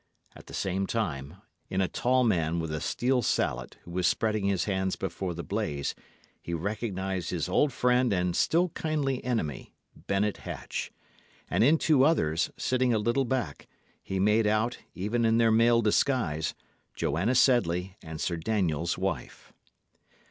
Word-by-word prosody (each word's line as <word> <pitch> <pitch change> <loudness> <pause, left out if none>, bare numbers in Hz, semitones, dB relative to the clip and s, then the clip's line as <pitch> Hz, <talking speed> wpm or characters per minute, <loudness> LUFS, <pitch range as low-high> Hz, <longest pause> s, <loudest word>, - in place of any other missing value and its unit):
At - - -14
the - - -8
same 95 +1 -1
time, 80 -9 -3 0.3
in 95 - -1
a 95 - +2
tall 130 +5 +2
man 85 -7 +1
with 80 -1 -3
a 75 - -3
steel 125 +1 +1
salet, - - -1
who 85 - -11
was 90 0 +1
spreading 110 -2 +1
his 100 -2 +1
hands 95 -2 -1
before 90 -1 -4
the 85 - -5
blaze, 95 -10 -2 0.5
he 85 - -4
recognised 95 0 -3
his 90 -1 -2
old 135 +10 +2
friend 125 0 +2
and 90 -2 0
still 175 +2 +2
kindly 150 -5 -2
enemy, 110 - -3 0.2
Bennet 100 +1 -1
Hatch; - - -5 0.6
and - - +3
in 150 +6 +5
two 150 -4 +4
others, 85 - +2
sitting 125 -2 +1
a - - +3
little 120 +5 +1
back, 120 - -3 0.3
he 95 - -3
made 105 +3 +3
out, 110 +3 +1 0.2
even 105 +6 -1
in 115 0 +3
their 115 -1 +4
male 115 +1 +4
disguise, 105 - +1 0.4
Joanna 95 - 0
Sedley 95 -8 +3
and 80 -1 -8
Sir 85 +1 -1
Daniel's 85 -3 0
wife. 95 +1 -4
100 Hz, 155 wpm, -28 LUFS, 85-120 Hz, 0.6 s, in